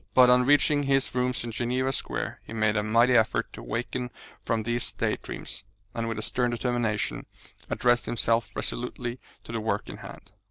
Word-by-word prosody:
But 125 Hz, -1 st, +8 dB
on 125 Hz, 0 st, +5 dB
reaching 145 Hz, +1 st, +4 dB
his 135 Hz, -1 st, +1 dB
rooms 125 Hz, 0 st, 0 dB
in 120 Hz, -, -4 dB
Geneva 125 Hz, +3 st, 0 dB
Square -, -, -3 dB
he -, -, -10 dB
made 110 Hz, -1 st, +2 dB
a 105 Hz, -, +2 dB
mighty 115 Hz, +4 st, +4 dB
effort 110 Hz, -2 st, +2 dB
to -, -, -8 dB
waken 125 Hz, +2 st, -3 dB, 0.3 s
from 110 Hz, -1 st, 0 dB
these 120 Hz, +1 st, -1 dB
day -, -, 0 dB
dreams, -, -, -6 dB, 0.3 s
and 115 Hz, 0 st, -2 dB
with 115 Hz, -, -3 dB
a 110 Hz, -, -3 dB
stern 125 Hz, -1 st, +1 dB
determination 120 Hz, -4 st, -1 dB, 0.4 s
addressed 120 Hz, 0 st, +2 dB
himself 115 Hz, -3 st, +1 dB
resolutely 125 Hz, 0 st, -3 dB, 0.2 s
to -, -, -9 dB
the 115 Hz, -, -2 dB
work 105 Hz, -1 st, -1 dB
in -, -, -7 dB
hand. -, -, -11 dB
120 Hz, 185 wpm, -27 LUFS, 115-125 Hz, 0.4 s, But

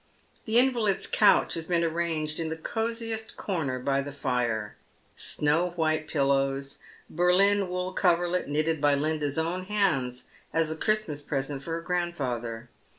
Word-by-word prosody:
The 220 Hz, +1 st, +1 dB
in 260 Hz, +2 st, +5 dB
valid's 215 Hz, -5 st, 0 dB
couch 210 Hz, -, +4 dB
has 165 Hz, -1 st, -2 dB
been 170 Hz, -1 st, +2 dB
arranged 160 Hz, -2 st, -1 dB
in 165 Hz, -1 st, -2 dB
the 160 Hz, -, -3 dB
cosiest 225 Hz, +3 st, -3 dB
corner 155 Hz, -10 st, -2 dB
by 135 Hz, +2 st, 0 dB
the 145 Hz, +1 st, -6 dB
fire; 120 Hz, -6 st, -1 dB, 0.4 s
snow 165 Hz, +4 st, +1 dB
white 155 Hz, -2 st, 0 dB
pillows, 135 Hz, -1 st, 0 dB, 0.3 s
Berlin 185 Hz, +3 st, +3 dB
wool 180 Hz, +1 st, -3 dB
coverlet, 175 Hz, -1 st, +1 dB
knitted 155 Hz, +1 st, 0 dB
by 145 Hz, -1 st, +4 dB
Linda's 150 Hz, 0 st, -1 dB
own 170 Hz, +3 st, -1 dB
hands 155 Hz, -12 st, 0 dB, 0.3 s
as 160 Hz, -1 st, +1 dB
a -, -, -2 dB
Christmas 215 Hz, -6 st, -1 dB
present 140 Hz, -1 st, -3 dB
for 165 Hz, +3 st, -5 dB
her 165 Hz, -, -2 dB
grandfather. 130 Hz, -10 st, -3 dB
160 Hz, 150 wpm, -27 LUFS, 140-180 Hz, 0.4 s, in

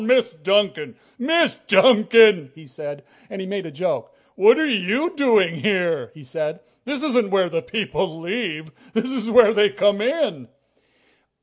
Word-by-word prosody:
"Well, -, -, -5 dB
Miss 240 Hz, -, -1 dB
Duncan! 190 Hz, -1 st, -1 dB, 0.2 s
Miss 320 Hz, +4 st, +1 dB
Duncan!" 215 Hz, -, +4 dB
he 160 Hz, 0 st, -16 dB
said, 145 Hz, +1 st, -9 dB, 0.3 s
and 195 Hz, -, -8 dB
he 190 Hz, -, -5 dB
made 195 Hz, -2 st, -5 dB
a -, -, -10 dB
joke. 180 Hz, +6 st, -4 dB, 0.2 s
"What 445 Hz, +4 st, +5 dB
are 315 Hz, -, +1 dB
you 255 Hz, -, -1 dB
doing 215 Hz, -, +2 dB
here?" 185 Hz, -5 st, -1 dB
he 150 Hz, -, -14 dB
said. 155 Hz, +3 st, -5 dB, 0.3 s
"This 285 Hz, +2 st, -4 dB
isn't 245 Hz, -8 st, 0 dB
where 190 Hz, -2 st, +1 dB
the 165 Hz, -1 st, -3 dB
people 190 Hz, -6 st, -4 dB
leave. 170 Hz, -4 st, -5 dB, 0.2 s
This 230 Hz, +3 st, -1 dB
is 235 Hz, -4 st, -4 dB
where 225 Hz, -2 st, +5 dB
they 210 Hz, -1 st, +3 dB
come 205 Hz, +1 st, 0 dB
in!" 255 Hz, -, -2 dB
205 Hz, 165 wpm, -21 LUFS, 165-245 Hz, 0.3 s, What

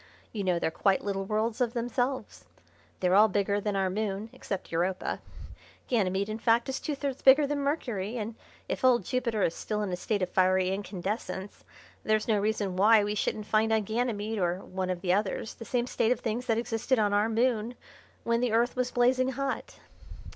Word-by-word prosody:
You 205 Hz, -3 st, -3 dB
know 180 Hz, -2 st, +1 dB
they're 165 Hz, -, -1 dB
quite 195 Hz, +3 st, +1 dB
little 195 Hz, -1 st, -2 dB
worlds 215 Hz, +3 st, -1 dB
of 240 Hz, -2 st, +1 dB
themselves. 245 Hz, +2 st, -2 dB, 0.6 s
They're 180 Hz, 0 st, +2 dB
all 210 Hz, +3 st, +7 dB
bigger 205 Hz, 0 st, 0 dB
than 205 Hz, -1 st, -2 dB
our 195 Hz, -1 st, +1 dB
moon, 210 Hz, +2 st, -3 dB
except 200 Hz, -6 st, -6 dB
Europa. 180 Hz, +3 st, -1 dB, 0.7 s
Ganymede, 200 Hz, -4 st, +1 dB
in 215 Hz, +1 st, -4 dB
fact, 230 Hz, +2 st, +2 dB
is 265 Hz, -, -2 dB
two 300 Hz, -, -3 dB
thirds 275 Hz, -2 st, -4 dB
bigger 275 Hz, +2 st, +7 dB
than 290 Hz, 0 st, -1 dB
Mercury, 245 Hz, -7 st, -2 dB
and 225 Hz, 0 st, -4 dB, 0.3 s
if -, -, -4 dB
old 245 Hz, -6 st, +4 dB
Jupiter 235 Hz, -4 st, 0 dB
is 165 Hz, -, +1 dB
still 210 Hz, +3 st, -3 dB
in 195 Hz, -, -3 dB
a -, -, 0 dB
state 200 Hz, +2 st, -1 dB
of 185 Hz, -, -1 dB
fiery 185 Hz, 0 st, +3 dB
incandescence 195 Hz, 0 st, -4 dB, 0.4 s
there's 215 Hz, 0 st, +1 dB
no 215 Hz, -3 st, +3 dB
reason 205 Hz, -2 st, -1 dB
why 210 Hz, +3 st, +6 dB
we 205 Hz, +1 st, -1 dB
shouldn't 210 Hz, 0 st, -2 dB
find 220 Hz, +1 st, +2 dB
on 220 Hz, -1 st, +2 dB
Ganymede 220 Hz, -1 st, -2 dB
or 180 Hz, 0 st, 0 dB
one 185 Hz, 0 st, -3 dB
of 180 Hz, -1 st, -2 dB
the 180 Hz, -2 st, +2 dB
others 205 Hz, +2 st, -1 dB
the 230 Hz, -, -10 dB
same 240 Hz, 0 st, 0 dB
state 235 Hz, -2 st, 0 dB
of 250 Hz, -, +1 dB
things 235 Hz, +2 st, -3 dB
that 225 Hz, -, +2 dB
existed 235 Hz, +2 st, 0 dB
on 205 Hz, -2 st, +2 dB
our 205 Hz, +2 st, +2 dB
moon 230 Hz, 0 st, 0 dB, 0.5 s
when 235 Hz, 0 st, +1 dB
the 245 Hz, -3 st, 0 dB
Earth 235 Hz, +2 st, +2 dB
was 250 Hz, -1 st, 0 dB
blazing 255 Hz, +2 st, +2 dB
hot." 275 Hz, +1 st, -3 dB
215 Hz, 200 wpm, -29 LUFS, 195-240 Hz, 0.7 s, all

